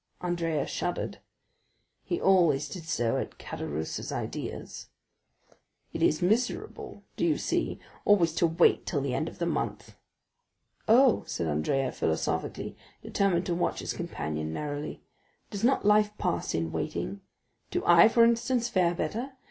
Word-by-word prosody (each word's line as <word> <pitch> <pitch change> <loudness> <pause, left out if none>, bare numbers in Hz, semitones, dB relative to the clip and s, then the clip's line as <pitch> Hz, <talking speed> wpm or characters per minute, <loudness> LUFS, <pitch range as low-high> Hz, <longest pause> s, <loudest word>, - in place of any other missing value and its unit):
Andrea 170 -4 -1
shuddered; - - -3 0.8
he - - -2
always 170 -7 +4
did 175 -4 -8
so 120 -9 0
at - - -4
Caderousse's 75 +2 -5
ideas. - - -5 1.1
"It - - -4
is 155 - +3
miserable—do 225 +7 -2
you - - +3
see?—always 175 -6 0
to 170 - +3
wait 165 +2 +3
till 150 - 0
the 135 -2 -2
end 155 - -1
of - - -14
the 175 - -1
month." 170 - -3 0.9
"Oh," 245 +2 +5
said 85 - -2
Andrea 80 - 0
philosophically, 80 0 -2 0.3
determined 190 -3 +1
to 175 - -1
watch 175 - 0
his - - -3
companion 75 0 -4
narrowly, 145 - -5 0.5
"does 200 -1 -5
not 255 -3 +3
life 210 0 +4
pass 180 -3 -1
in 80 0 -1
waiting? 100 0 -3 0.5
Do - - -2
I, 170 +3 +8
for 230 +1 +5
instance, 235 +1 +1
fare 175 -4 +2
better? 245 +9 -3
170 Hz, 135 wpm, -28 LUFS, 140-210 Hz, 1.1 s, I